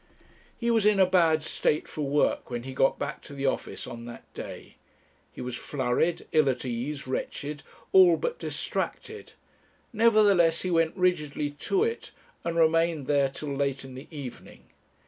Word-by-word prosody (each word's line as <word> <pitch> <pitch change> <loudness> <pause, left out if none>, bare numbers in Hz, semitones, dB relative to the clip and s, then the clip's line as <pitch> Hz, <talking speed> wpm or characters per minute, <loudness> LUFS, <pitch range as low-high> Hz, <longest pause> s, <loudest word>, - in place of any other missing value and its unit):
He 235 0 0
was 225 -2 +3
in 210 -2 +4
a 190 - +7
bad 165 -4 +3
state 155 0 0
for 155 - -6
work 145 +1 +1
when 120 -1 -4
he 130 +1 -7
got 135 +1 +2
back 145 0 -4
to 140 - -11
the 140 0 -3
office 135 - -2
on 115 -1 -8
that 120 0 -9
day. - - -9 0.5
He - - -9
was 125 -1 -4
flurried, 135 +6 -1
ill 155 -3 +4
at 130 - -2
ease, 130 +4 -3
wretched, 145 +3 -4 0.3
all 180 -3 +7
but 485 - -3
distracted; 435 0 -4 0.6
nevertheless 205 -7 +4
he 185 - -1
went 165 +1 +2
rigidly 150 -5 0
to 385 - 0
it, 460 +1 -3 0.3
and 170 -1 -2
remained 165 -2 +3
there 140 -1 +2
till 140 +1 -5
late 140 -1 -1
in 130 - -10
the 130 +3 -10
evening. 140 -6 -10
150 Hz, 165 wpm, -27 LUFS, 135-180 Hz, 0.6 s, a